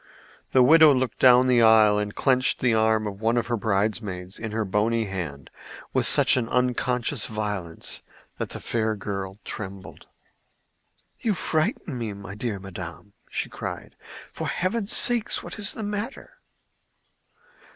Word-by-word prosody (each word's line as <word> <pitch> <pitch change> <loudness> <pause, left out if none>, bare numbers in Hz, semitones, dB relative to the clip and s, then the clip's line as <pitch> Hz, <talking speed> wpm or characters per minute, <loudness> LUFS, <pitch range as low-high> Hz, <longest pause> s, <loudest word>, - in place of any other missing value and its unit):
The 130 - +5
widow 155 +3 +7
looked 130 -1 -2
down 125 0 +6
the 125 -2 +4
aisle 110 -2 +6
and 105 0 -4
clenched 130 -2 +1
the 125 -2 +2
arm 110 0 +2
of 100 0 -6
one 115 +2 +1
of 120 - 0
her 120 - -1
bridemaids 100 -3 -2
in 110 -1 -5
her 110 0 -1
bony 110 +4 0
hand 80 -9 -6 0.4
with - - +4
such - - +5
unconscious 125 +1 0
violence 105 -6 -4 0.4
that - - -3
the - - -6
fair 110 -2 -1
girl 95 -1 -5
trembled. 100 -2 -8 1.1
"You 220 -4 0
frighten 160 - -1
me, 110 -3 -4
my 100 0 -9
dear 105 0 -4
madam," 95 +1 -9 0.4
cried - - -7
she. - - -23 0.3
"For - - -4
heaven's 200 +4 -1
sake, 240 -3 +4
what - - -8
is 205 - +1
the 220 - -6
matter?" 210 - -6
110 Hz, 145 wpm, -25 LUFS, 100-130 Hz, 1.1 s, widow